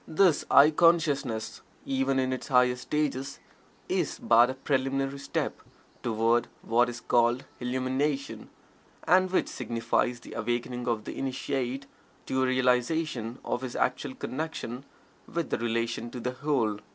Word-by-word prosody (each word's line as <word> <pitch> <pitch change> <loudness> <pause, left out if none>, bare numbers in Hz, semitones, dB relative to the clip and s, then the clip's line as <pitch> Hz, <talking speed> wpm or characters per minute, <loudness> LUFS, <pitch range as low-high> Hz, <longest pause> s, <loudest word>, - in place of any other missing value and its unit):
This 165 -1 +3
"I" 145 +3 +7
consciousness, 150 -8 +2 0.2
even 135 0 0
in 130 0 +1
its 130 - -5
highest 125 -1 +3
stages, 140 -2 -2 0.5
is - - -1
but 120 +2 +5
a 130 - -3
preliminary 135 0 -1
step - - -3 0.4
toward 115 +1 +2 0.2
what 120 +2 +3
is 120 0 -6
called 120 +2 +2
"Illumination," 130 +3 -2 0.5
and 185 +1 +4
which 185 - +1
signifies 115 0 -1
the - - -11
awakening 120 +2 -2
of 115 -3 0
the - - -7
Initiate 135 0 -2 0.4
to 130 - 0
a 130 - +3
realization 125 -1 +1
of 120 - -2
his 130 -1 -5
actual 130 +1 -1
connection 135 -3 -5 0.5
with 170 -1 -2
and - - 0
relation 115 0 -1
to 125 - -7
the 125 +2 -2
Whole. 130 -6 0
130 Hz, 140 wpm, -28 LUFS, 120-140 Hz, 0.5 s, I